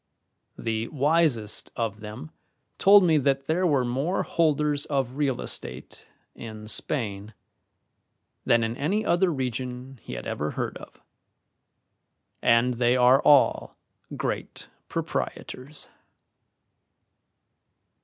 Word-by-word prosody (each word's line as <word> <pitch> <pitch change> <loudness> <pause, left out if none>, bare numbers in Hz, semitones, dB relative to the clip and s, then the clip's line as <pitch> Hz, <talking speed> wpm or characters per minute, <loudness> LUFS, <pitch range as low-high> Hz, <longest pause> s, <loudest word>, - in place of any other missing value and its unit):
The 115 0 -2
wisest 145 -7 +1
of 110 -3 -3
them 105 -7 -9 0.5
told 200 0 +7
me 160 -4 +4
that 135 0 0
there 175 +5 +1
were 140 -5 +2
more 135 +10 -1
holders 150 -3 +1
of 135 -3 -1
real 140 -3 0
estate - - -8 0.3
in 110 -2 -9
Spain 105 -4 -2 1.1
than 115 -1 +3
in 115 +1 -2
any 195 - -1
other 175 +1 +2
region 130 -1 -4
he - - -8
had - - -6
ever 75 - -3
heard - - -2
of, - - -14 1.4
and 115 +2 +3
they 120 +1 +2
are 125 +3 +5
all 145 -2 +4 0.4
great - - -4 0.2
proprietors. 140 +4 -5
130 Hz, 105 wpm, -26 LUFS, 115-150 Hz, 1.4 s, told